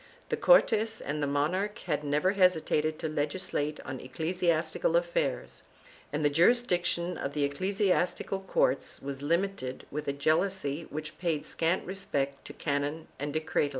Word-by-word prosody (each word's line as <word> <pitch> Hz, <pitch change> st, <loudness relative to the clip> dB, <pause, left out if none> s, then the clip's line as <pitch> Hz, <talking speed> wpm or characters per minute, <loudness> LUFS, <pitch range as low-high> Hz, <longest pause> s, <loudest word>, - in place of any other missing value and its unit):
The -, -, +1 dB
Cortes 225 Hz, -, +4 dB
and 150 Hz, +2 st, -3 dB
the 145 Hz, -, +1 dB
mon 145 Hz, +4 st, +1 dB
arch 205 Hz, +4 st, -2 dB
had 150 Hz, 0 st, -1 dB
never 150 Hz, +6 st, +2 dB
hesitated 160 Hz, -5 st, +2 dB
to 160 Hz, -, -3 dB
legislate 150 Hz, 0 st, -2 dB
on 130 Hz, -1 st, -6 dB
ecclesiastical 165 Hz, -, 0 dB
affairs, -, -, -1 dB, 0.5 s
and 150 Hz, +1 st, -1 dB
the -, -, +5 dB
jurisdiction 175 Hz, -1 st, +2 dB
of 140 Hz, -, -3 dB
the 145 Hz, -1 st, 0 dB
ecclesiastical 190 Hz, +4 st, 0 dB
courts 180 Hz, -8 st, 0 dB
was 135 Hz, 0 st, -6 dB
limited 170 Hz, -3 st, -1 dB
with 150 Hz, +1 st, -4 dB
a 140 Hz, -, +1 dB
jealousy 155 Hz, +1 st, 0 dB
which 155 Hz, +1 st, -6 dB
paid 165 Hz, -4 st, -1 dB
scant 165 Hz, +3 st, 0 dB
respect 140 Hz, -8 st, -2 dB
to -, -, -8 dB
canon 145 Hz, +2 st, -2 dB
and 145 Hz, +1 st, -2 dB
decretal. 155 Hz, -1 st, 0 dB
160 Hz, 150 wpm, -30 LUFS, 145-185 Hz, 0.5 s, the